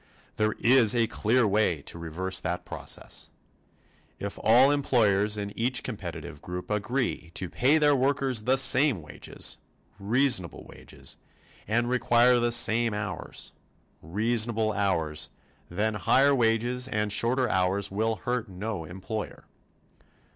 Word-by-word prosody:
There 110 0 +1
is 120 -2 +4
a 115 -1 +3
clear 115 +2 +1
way 95 -7 +1
to 85 - -6
reverse 85 +3 -2
that 90 0 -4
process: - - -4 0.9
If 100 0 -6
all 125 +6 +5
employers 105 -7 +2
in 100 -1 -5
each 120 +2 0
competitive 90 - -7
group 90 +3 -7
agree 105 -3 -2
to 95 -2 -3
pay 140 +5 +3
their 145 -2 +4
workers 135 -2 +1
the 130 +4 +1
same 130 - +4
wages 75 - -4 0.4
reasonable 110 -3 +1
wages - - -9 0.5
and 115 +2 +1
require 125 0 +3
the 120 0 +1
same 115 -1 +3
hours 105 -5 -5 0.5
reasonable 110 +5 0
hours 80 -7 -1 0.4
then 105 +5 -1
higher 135 +7 +3
wages 120 +1 0
and 105 -4 -1
shorter 125 +2 +1
hours 95 +1 +1
will 110 +3 0
hurt 115 +3 -3
no 95 -2 -5
employer. 95 +5 -7
110 Hz, 125 wpm, -27 LUFS, 100-125 Hz, 0.9 s, all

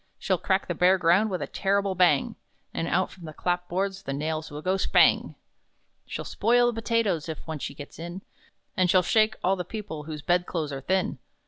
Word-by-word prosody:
She'll 185 -3 0
crack 190 0 0
the 175 - -1
bare 180 +3 +4
ground 180 +5 +3
with 185 -2 -2
a - - -2
terrible 200 0 0
bang! 175 -6 +3 0.4
And 165 - -2
out 185 +2 +1
from 180 -3 -12
the 155 - -8
clap 180 +2 -2
boards 195 +2 -2
the 135 - -4
nails 155 +2 -3
will 150 0 -8
go, 185 +1 +1
spang! 195 - +3 0.7
"She'll - - -5
spoil 240 +3 +3
the 225 -1 -5
potatoes 210 -9 0
(if 160 - -6
once 160 -3 -5
she - - -5
gets 145 +1 -10
in), 175 +3 -7 0.5
And 185 -1 +2
she'll 185 +1 +5
shake 220 +4 +3
all 190 +2 +3
the 180 - -4
people 175 -6 -7
whose 155 -2 -7
bed 175 0 +1
clothes 155 -4 -3
are 135 - -5
thin! 185 +6 0
180 Hz, 210 wpm, -26 LUFS, 160-195 Hz, 0.7 s, she'll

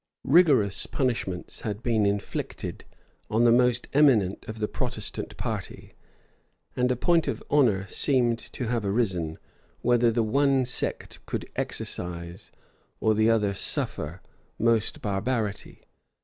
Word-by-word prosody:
Rigorous 135 - +4
punishments 115 -9 -2
had 105 +1 -4
been 110 -4 +2
inflicted 100 0 -4 0.4
on 110 +2 +2
the 120 - +6
most 125 0 +3
eminent 125 -10 +4
of 110 0 -6
the 105 -1 -1
Protestant - - -5
party; - - -5 0.8
and 125 0 +2
a - - +2
point 165 +6 +2
of - - -3
honor 115 -10 +3
seemed 120 +1 +1
to 125 - -6
have 115 -1 -1
arisen, 95 -7 -1 0.4
whether 120 -1 +3
the 115 0 +1
one 135 +3 +2
sect 125 - -3
could - - -3
exercise, 85 0 -4 0.5
or 110 - +3
the 110 +1 +3
other 105 -3 +2
suffer, 85 -2 -3 0.3
most 115 -1 +1
barbarity. 105 +1 -2
115 Hz, 125 wpm, -26 LUFS, 100-125 Hz, 0.8 s, the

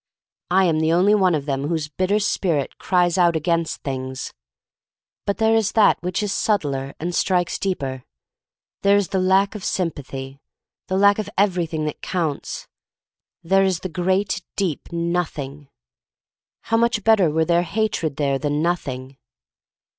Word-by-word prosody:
I 190 +1 +4
am 160 -3 +2
the 160 0 +2
only 185 +5 +4
one 190 -5 +3
of 145 -2 -3
them 140 -1 -2
whose 160 -2 -1
bitter 185 +7 0
spirit 175 -8 -1
cries 180 -1 +2
out 170 -2 +4
against 165 +1 -1
things. 130 -1 -5 0.9
But 200 - 0
there 220 0 +3
is 225 -2 +2
that 220 -2 +4
which 180 +4 -2
is 205 -1 -1
subtler 140 -12 -1
and 175 +3 -3
strikes 180 -1 +1
deeper. 135 -9 -3 0.8
There 200 0 +4
is 200 -3 0
the 195 -1 0
lack 190 +2 +3
of 210 -3 -7
sympathy 140 -6 -4 0.2
— - - -72
the 190 - 0
lack 200 +1 +5
of 215 - -3
everything 175 -5 +1
that 150 - -5
counts: 165 -6 -3 0.8
there 195 +3 +3
is 185 -3 0
the 185 - -4
great, 185 +4 0
deep 180 -7 -2
Noth 170 0 -1
ing. 140 0 -7 0.9
How 225 - 0
much 235 -2 +1
better 215 -7 +4
were 160 +1 +1
there 170 0 +3
hatred 175 -6 -1
here 140 -2 0
than 145 0 -1
Nothing! 135 -6 -3
175 Hz, 160 wpm, -22 LUFS, 150-195 Hz, 0.9 s, lack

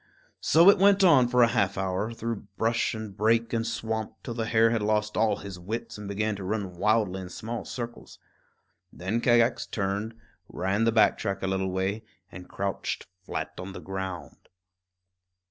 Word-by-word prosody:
So 165 +3 +5
it 200 - 0
went 200 0 +5
on 140 -9 +6
for 125 0 +4
a - - +6
half 100 0 +1
hour, 95 +3 -1
through 115 -2 -5
brush 115 +1 +1
and 110 -3 -7
brake 115 +3 +2
and 115 0 0
swamp, 110 -1 -3
till 120 - -5
the 115 -1 -3
hare 115 0 +4
had 115 -2 0
lost 105 0 0
all 110 0 +2
his 100 -3 -8
wits 115 +6 -5
and 105 -1 -8
began 105 +1 -1
to 100 - -7
run 100 -1 -3
wildly 105 -1 +1
in 90 - -8
small 115 +5 -5
circles. 120 -1 -7 0.7
Then 100 +6 -2
Kagax 120 0 +3
turned, 100 +2 -2 0.3
ran 100 +5 0
the 115 - +3
back 110 -1 +4
track 100 -2 -3
a - - 0
little 95 0 -1
way, 95 +3 -1 0.3
and 90 -1 -10
crouched 100 0 -3 0.2
flat - - -4
on 95 +1 -6
the - - -7
ground. 95 -2 -7
110 Hz, 180 wpm, -27 LUFS, 95-115 Hz, 0.7 s, on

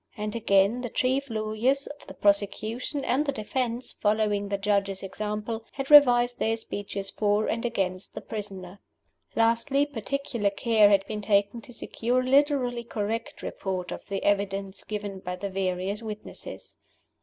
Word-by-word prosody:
And, 210 +1 -3
again, 200 +1 +3
the 245 - -4
chief 260 +4 0
lawyers 225 +5 0
for - - -17
the - - -9
prosecution 215 +7 0
and 265 +4 +2
the 290 - 0
defense, 245 0 -2
following 210 -1 +1
the 200 - 0
Judge's 200 -1 0
example, 210 +3 -4
had 270 +1 -4
revised 245 -4 +7
their 225 0 +1
speeches 200 -2 -5
for 210 0 +1
and 230 - -1
against 195 -5 -2
the - - -5
prisoner. 195 -3 -7 0.6
Lastly, 235 +5 +3
particular 260 -4 -2
care 215 +1 +4
had 195 -1 +4
been 210 0 -4
taken 200 +2 +2
to 245 - -10
secure 245 +1 -1
a - - -4
literally 265 -3 +3
correct 225 0 -4
report 185 -2 -4
of - - -6
the 195 -1 -3
evidence 200 -1 0
given 205 -2 -5
by 180 -1 -4
the 195 +2 -5
various 190 +2 -1
witnesses. 215 -2 -8
215 Hz, 155 wpm, -27 LUFS, 200-240 Hz, 0.6 s, revised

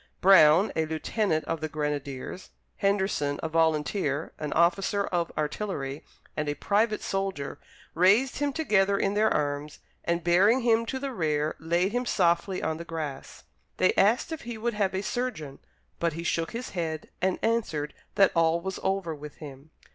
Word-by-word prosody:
Brown, 185 0 +6
a 160 -1 0
lieutenant 160 +1 -1
of 165 - -3
the 155 - -1
grenadiers, 150 +2 -4 0.3
Henderson, 190 -8 0
a - - 0
volunteer, 160 -1 0
an 150 -1 -4
officer 195 +5 +2
of 175 -3 -1
artillery, 150 -3 -3 0.3
and 150 -1 -2
a 145 - -1
private 210 +7 +1
soldier, 195 -8 -3 0.3
raised 200 +10 +3
him 290 -1 +1
together 200 -10 +2
in 195 0 0
their 215 +1 +3
arms, 145 0 -2 0.3
and 170 0 -1
bearing 195 +9 +4
him 230 -1 +2
to 265 - -2
the 270 0 -4
rear 155 -5 0
laid 170 +4 +1
him 245 +1 -1
softly 185 0 +1
on 160 0 -1
the 170 - -6
grass. 155 -5 -6 0.3
They 185 - +3
asked 225 +10 +3
if 320 - -4
he 235 -1 -6
would 235 +2 -2
have 200 -3 0
a 190 - -2
surgeon, 205 - -4 0.4
but 170 -1 0
he 165 +2 -5
shook 165 -1 -1
his 240 +2 -6
head 160 -4 -4
and 185 0 +1
answered 185 -11 0 0.2
that 195 - +5
all 165 0 +3
was 190 +2 -5
over 190 -4 -1
with 150 0 -9
him. 145 0 -11
170 Hz, 170 wpm, -27 LUFS, 155-205 Hz, 0.4 s, Brown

